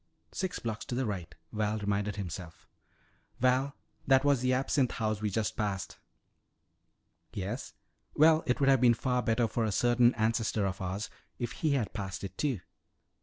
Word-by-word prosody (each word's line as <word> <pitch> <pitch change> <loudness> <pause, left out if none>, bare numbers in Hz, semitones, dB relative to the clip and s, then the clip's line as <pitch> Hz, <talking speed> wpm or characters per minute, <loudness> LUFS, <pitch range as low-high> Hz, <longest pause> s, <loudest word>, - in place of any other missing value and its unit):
Six 185 -1 -3
blocks 110 -2 -4
to 120 - -4
the 130 +1 0
right," 95 -5 -4 0.2
Val 105 0 0
reminded 105 0 -1
himself. 90 -4 -7 0.7
"Val, 130 +3 +2 0.3
that 135 +1 +5
was 140 -3 +3
the 130 0 +2
Absinthe 130 0 +1
House 110 -2 -1
we 105 - 0
just 105 +1 -1
passed!" 100 -5 -3 1.3
"Yes? 105 +7 -4 0.4
Well, 155 +1 +6
it 125 - +1
would 140 - +3
have 135 -2 +5
been 120 -2 +6
better 125 -2 +1
for 115 - -1
a 110 - 0
certain 120 +3 +4
ancestor 110 -2 +1
of 95 0 -3
ours 95 +3 -3 0.3
if 120 - -3
he 155 -3 0
had 125 -7 -1
passed 100 -2 -5
it, 95 -1 -6
too. 130 -8 -1
115 Hz, 165 wpm, -31 LUFS, 100-130 Hz, 1.3 s, Well